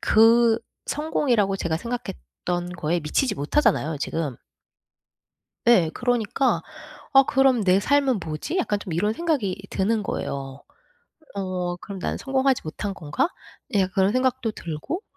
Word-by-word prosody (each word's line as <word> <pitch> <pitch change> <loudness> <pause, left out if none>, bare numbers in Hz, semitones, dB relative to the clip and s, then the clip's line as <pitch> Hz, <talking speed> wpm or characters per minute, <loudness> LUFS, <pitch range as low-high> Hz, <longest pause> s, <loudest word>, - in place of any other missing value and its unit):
그 230 +1 +5 0.3
성공이라고 245 -10 +1
제가 165 -4 -1
생각했던 175 - -4
거에 170 +2 0
미치지 205 - 0
못하잖아요, 155 - +1
지금. 145 -3 -3 1.3
예, 185 -10 +5
그러니까 245 +1 +1 0.5
'아 270 - +9
그럼 265 -5 +3
내 185 +1 +4
삶은 275 0 +2
뭐지?' 155 - -3
약간 210 - 0
좀 185 -4 -7
이런 210 +6 +1
생각이 230 - -1
드는 210 +3 +1
거예요. 135 -7 -4 0.7
어 180 -2 -2
'그럼 195 +2 -8
난 - - -2
성공하지 270 -1 +1
못한 195 +6 -4
건가?' 150 - -1 0.5
예 200 - +4
약간 185 -1 0
그런 195 +2 +3
생각도 255 -2 +1
들고. 170 - -5
200 Hz, 285 characters per minute, -24 LUFS, 175-250 Hz, 1.3 s, 아